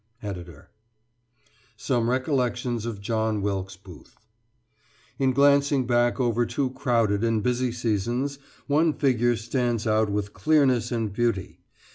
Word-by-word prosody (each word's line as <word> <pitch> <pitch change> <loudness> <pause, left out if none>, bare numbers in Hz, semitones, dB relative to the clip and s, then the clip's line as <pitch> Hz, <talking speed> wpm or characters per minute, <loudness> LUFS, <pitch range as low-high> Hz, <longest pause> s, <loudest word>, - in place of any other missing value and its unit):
Ed.] 90 -4 -6 1.3
SOME 120 -2 0
RECOLLECTIONS 125 -3 -1
OF 105 -4 -5
JOHN 110 -1 -1
WILKES 95 -2 -3
BOOTH 90 -3 -15 1.0
In 135 -1 +3
glancing 140 0 +3
back 120 +1 +1
over 120 -1 +1
two 130 +2 -2
crowded 115 -6 +1
and 115 -2 +1
busy 125 +1 0
seasons, 120 +4 -2 0.3
one 155 +2 +2
figure 120 -4 +2
stands 120 0 -1
out 110 -1 +2
with 100 0 -3
clearness 135 -7 +2
and 115 -4 -2
beauty. 115 -4 -1
120 Hz, 120 wpm, -25 LUFS, 110-130 Hz, 1.3 s, In